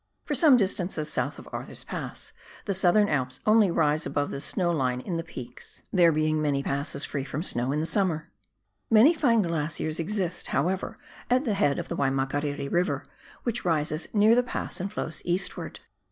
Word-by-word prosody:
For - - -2
some 300 -7 +6
distance 190 -3 0
south - - -2
of - - -11
Arthur's - - -7
Pass - - -6 0.3
the 200 - 0
Southern 190 +3 +4
Alps 130 -4 -1
only 215 -2 +5
rise 155 -2 +2
above 145 0 -1
the 140 - -5
snow 175 +3 -1
line 130 -6 0
in 170 +6 -3
the 165 - -3
peaks, 125 -7 -10
there 175 -3 +6
being 155 0 +1
many 145 -2 +1
INTRODUCTORY - - -3
RE]SIARKS. 140 - -3
3 - - -4
passes 140 - +2
free 140 - -3
from 145 +3 -4
snow 125 -6 0
in 150 +2 0
the - - -1
summer. 170 -4 -1 0.6
Many 230 +9 +7
fine 240 -9 +3
glaciers 160 -1 -2
exist, 180 0 -2
however, 190 +5 -1 0.3
at 255 +4 +3
the 220 - +1
head 195 -8 +2
of - - -4
the - - -4
Waimakariri 140 +2 -1
E,iver, 175 +7 0 0.4
which 240 -1 -2
rises 155 -2 0
near 215 +1 +5
the 245 - +5
pass 245 -6 -5
and 195 +2 -3
flows 165 -6 -4
eastwards. 180 +2 -2
170 Hz, 195 wpm, -27 LUFS, 145-205 Hz, 0.6 s, Many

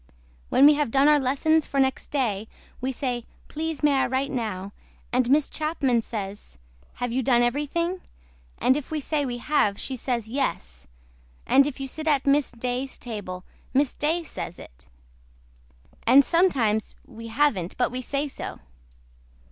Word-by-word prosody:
WHEN 275 - +6
WE 300 - +9
HAVE 295 -3 0
DONE 270 +4 +4
OUR 300 -1 +6
LESSONS 285 +4 +2
FOR 275 - -1
NEXT 265 -1 +1
DAY 225 -7 -1 0.3
WE 260 +1 -1
SAY 245 -2 -3 0.3
PLEASE 315 0 -4
MAY 295 -1 +5
I 265 - +3
WRITE 265 +2 -1
NOW 205 -6 -3 0.4
AND 250 -1 +2
MISS 290 +1 +4
CHAPMAN 285 -6 0
SAYS 205 - -7 0.4
HAVE 245 -1 -3
YOU 260 +2 0
DONE 240 -1 +3
EVERYTHING 315 +8 -1 0.6
AND 260 - +3
IF 295 -2 -4
WE 315 - -2
SAY 290 0 -1
WE 245 -1 -3
HAVE 235 -6 +1
SHE 265 - -3
SAYS 235 -3 -2
YES 65 - -3 0.6
AND 275 +1 +5
IF 285 -2 -6
YOU 270 - -3
SIT 310 +4 -5
AT 285 -3 +2
MISS 285 0 +3
DAYS 250 +3 -3
TABLE 200 -6 -6 0.3
MISS 275 -1 +3
DAY 325 +4 0
SAYS 175 - -6
IT. - - -14 1.2
AND 265 +3 +7
SOMETIMES 255 - +2
WE 230 +1 -10
HAVEN'T 225 -8 0
BUT 245 - +1
WE 255 +1 -3
SAY 280 +3 -2
SO. 275 - -7
265 Hz, 165 wpm, -25 LUFS, 230-290 Hz, 1.2 s, WE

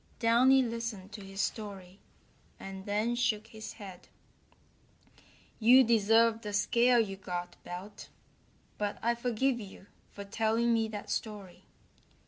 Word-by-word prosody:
Downy 255 +3 +5
listened 230 -5 -5
to 210 -1 -9
his 195 +1 -5
story, 195 -3 -5 0.6
and 195 0 -8
then 210 +4 0
shook 220 -3 0
his 220 -1 -9
head: 190 -4 -11 1.5
"You 245 +4 +7
deserve 225 0 +3
the 210 -2 -6
scare 235 +4 +3
you 195 -4 -1
got, 180 -2 -5
Belt, 190 +4 -9 0.7
but 205 -1 -2
I 235 +1 +3
forgive 240 +2 0
you 195 -2 -11 0.2
for 200 - -9
telling 225 +3 +1
me 225 -1 +1
that 210 -2 -7
story. 205 -5 -5
220 Hz, 125 wpm, -31 LUFS, 200-230 Hz, 1.5 s, You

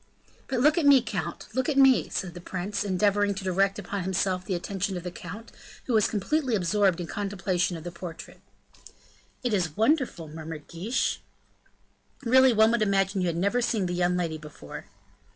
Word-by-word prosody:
"But 260 -3 -1
look 300 +5 +4
at 315 - 0
me, 280 -2 +8
count, 175 -7 -4
look 260 +4 0
at 285 - 0
me," 270 -2 +5
said 180 -3 -3
the 175 - -9
prince, 190 +3 -3
endeavoring 205 +1 +1
to 190 - -6
direct 195 +1 +1
upon 200 -1 -4
himself 185 0 -1
the 185 - -2
attention 190 +1 -3
of 175 - -7
the 180 - -5
count, 190 +6 -9 0.3
who 250 - -2
was 215 -2 +4
completely 255 +5 0
absorbed 195 -1 +2
in 175 - -3
contemplation 190 -2 -1
of 160 - -10
the 175 - -6
portrait. 170 -1 -9 1.0
"It 245 -3 0
is 175 -6 -1
wonderful," 235 - +1
murmured 155 0 -8
Guiche. 190 +9 -1 1.0
"Really 260 +1 +6
one 220 0 +5
would 235 -1 +1
imagine 195 -1 +1
you 180 - +1
had 170 -1 -1
never 200 +7 +1
seen 220 -4 0
the 175 - -2
young 180 0 +1
lady 165 -3 -2
before." 150 - -10
195 Hz, 185 wpm, -27 LUFS, 175-220 Hz, 1.0 s, me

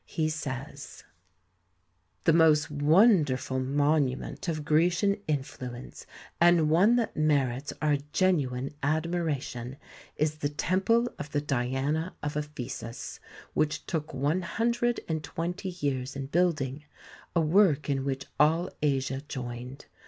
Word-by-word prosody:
He 155 -1 -1
says: 140 -2 -6 1.2
The 165 - +4
most 155 -2 +4
wonderful 150 - +3
monument 145 +2 0
of 155 -3 -2
Grecian 175 +6 +3
influ 130 -4 -3
ence, 125 - -11 0.3
and 170 -3 +5
one 195 +9 +5
that 235 -3 0
merits 140 -3 +1
our 150 -1 +3
genuine 140 -8 +1
admiration, 150 -5 -2 0.4
is 155 0 0
the 145 -1 -1
temple 190 +10 +1
of 150 0 -6
the 145 - +2
Diana 140 +5 -1
of 150 0 -3
Ephesus, 140 -5 -6 0.3
which 155 0 0
took 155 -3 -3
one 145 +7 0
hundred 235 +6 0
and 160 -2 -2
twenty 170 +4 -4
years 140 -7 -3
in 135 -1 -4
building, 150 -3 0 0.5
a 170 - +4
work 155 -3 +3
in 135 -2 0
which 135 -1 -3
all 165 +4 +3
Asia 135 -2 0
joined. 125 0 -6
150 Hz, 125 wpm, -28 LUFS, 135-170 Hz, 1.2 s, and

